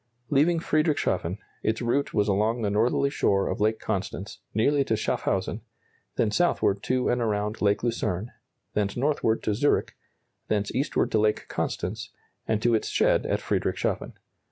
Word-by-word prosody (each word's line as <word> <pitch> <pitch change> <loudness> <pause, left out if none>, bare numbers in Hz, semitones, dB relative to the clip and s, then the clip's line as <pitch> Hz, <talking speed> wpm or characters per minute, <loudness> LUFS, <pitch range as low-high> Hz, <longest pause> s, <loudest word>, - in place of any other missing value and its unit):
Leaving 160 +4 +4
Friedrichshafen, 150 - 0 0.2
its 110 0 0
route 130 +4 0
was 105 -1 +1
along 110 +4 +1
the 100 - +1
northerly 120 +6 +2
shore 100 -6 +2
of 115 - -3
Lake 110 +1 +2
Constance 100 +2 -4
nearly 140 +7 +2
to 115 - 0
Schaffhausen, 110 - -1 0.5
then 110 - +1
southward 105 - +2
to 130 +2 0
and 125 0 +1
around 105 -1 -1
Lake 100 +1 +2
Lucerne, 110 -3 -1 0.4
thence 100 0 -1
northward 130 -4 +1
to 105 - +1
Zurich, 145 +8 +1 0.5
thence 105 -1 -1
eastward 140 +4 0
to 110 - +3
Lake 105 0 +1
Constance, 110 +6 -3 0.4
and 110 -1 0
to 120 - +3
its 110 - +1
shed - - +2
at - - 0
Friedrichshafen. - - -1
110 Hz, 155 wpm, -26 LUFS, 105-125 Hz, 0.5 s, Leaving